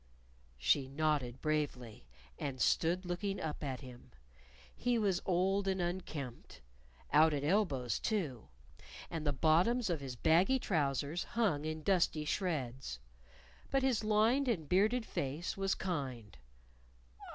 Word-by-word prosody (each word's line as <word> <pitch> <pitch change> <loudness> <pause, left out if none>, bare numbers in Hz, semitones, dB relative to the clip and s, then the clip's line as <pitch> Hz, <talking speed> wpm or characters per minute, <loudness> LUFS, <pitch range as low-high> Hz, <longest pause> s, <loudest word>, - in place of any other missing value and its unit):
She - - +2
nodded 140 -3 -1
bravely, 130 - -2 0.3
and 135 -2 -4
stood 175 +8 +2
looking 195 +3 -2
up 155 -1 -4
at 135 -2 -3
him. 125 -2 -12 0.7
He 245 -1 +1
was 200 -5 +1
old 190 +2 +2
and 190 -1 0
unkempt. 160 - -5 0.5
Out 155 0 +6
at 140 - -2
elbows, 145 - +1
too. 155 - -2 0.6
And 160 -2 -3
the - - +3
bottoms 180 - +3
of 165 - -1
his 130 -2 -6
baggy 170 - +4
trousers 150 - -1
hung 185 -11 0
in 155 0 -4
dusty 170 -5 +2
shreds. 135 - -2 0.7
But 270 -1 +1
his 255 -5 +2
lined 220 +6 +3
and 175 -11 0
bearded 215 - +2
face 145 +2 -3
was 195 0 0
kind! 130 - -4
160 Hz, 130 wpm, -34 LUFS, 140-195 Hz, 0.7 s, Out